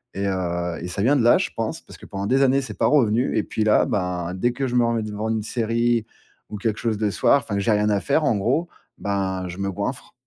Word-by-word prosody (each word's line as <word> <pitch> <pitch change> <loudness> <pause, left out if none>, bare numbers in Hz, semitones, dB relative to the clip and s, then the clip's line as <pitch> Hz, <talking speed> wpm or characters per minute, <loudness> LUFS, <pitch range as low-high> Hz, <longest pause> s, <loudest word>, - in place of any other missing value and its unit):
et 100 - -2
heu, 90 -2 -2
et 90 - -5
ça 100 +3 -2
vient 140 +5 +4
de 130 - +2
là, 120 - +6
je - - -2
pense, - - -3
parce - - -14
que - - -12
pendant 100 0 -4
des 130 +6 +2
années 135 0 +4
c'est 135 - -7
pas - - +2
revenu, 125 -4 +2
et 105 - +2
puis 110 - -2
là, 105 - +4
ben, 90 -6 -2
dès 120 +7 0
que 135 +2 -3
je 125 - -3
me 120 - +4
remets 115 -1 0
devant 105 +1 -4
une 110 -2 -1
série 115 0 0 0.4
ou 105 - -6
quelque 110 +1 -2
chose 110 -3 -1
le 105 -2 +1
soir 140 - +4
enfin 105 -4 -3
j'ai 105 +3 +1
rien 105 0 +2
à 100 -2 +1
faire, 150 +2 +1
en 115 - +2
gros, 130 - 0 0.3
ben 95 -2 -2
je 90 +1 -7
me 100 0 -2
goinfre. 105 +7 -5
110 Hz, 265 wpm, -23 LUFS, 100-120 Hz, 0.4 s, là